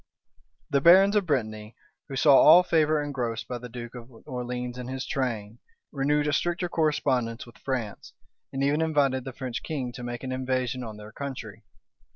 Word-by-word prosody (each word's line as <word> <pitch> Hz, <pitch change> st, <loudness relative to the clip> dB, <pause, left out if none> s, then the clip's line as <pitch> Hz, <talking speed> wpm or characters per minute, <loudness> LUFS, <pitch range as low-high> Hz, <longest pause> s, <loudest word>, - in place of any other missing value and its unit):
The 140 Hz, -1 st, +3 dB
barons 190 Hz, +6 st, +7 dB
of 200 Hz, -4 st, +2 dB
Brittany, 110 Hz, -6 st, -2 dB, 0.3 s
who 135 Hz, -, -5 dB
saw 140 Hz, +1 st, +6 dB
all 165 Hz, +6 st, +8 dB
favor 155 Hz, -3 st, +2 dB
engrossed 120 Hz, -6 st, -3 dB
by 125 Hz, -, -4 dB
the 125 Hz, +1 st, -9 dB
duke 120 Hz, 0 st, -8 dB
of 120 Hz, -1 st, -10 dB, 0.2 s
Orleans 125 Hz, -2 st, -4 dB
and 125 Hz, 0 st, -6 dB
his 130 Hz, 0 st, -4 dB
train, 115 Hz, -5 st, -3 dB, 0.3 s
renewed 145 Hz, +1 st, +1 dB
a 150 Hz, -, 0 dB
stricter 175 Hz, +4 st, 0 dB
correspondence 135 Hz, -8 st, 0 dB
with 120 Hz, -, -16 dB
France, 125 Hz, -6 st, -4 dB, 0.4 s
and 135 Hz, +1 st, -2 dB
even 145 Hz, +3 st, +2 dB
invited 140 Hz, -5 st, +1 dB
the 135 Hz, -, -5 dB
French 130 Hz, -2 st, -5 dB
king 135 Hz, -6 st, -4 dB
to 125 Hz, -, -9 dB
make 120 Hz, +1 st, -5 dB
an 130 Hz, -, -4 dB
invasion 130 Hz, -1 st, -2 dB
on 110 Hz, -3 st, -7 dB
their 105 Hz, 0 st, -11 dB
country. 115 Hz, -6 st, -7 dB
130 Hz, 180 wpm, -27 LUFS, 120-145 Hz, 0.4 s, all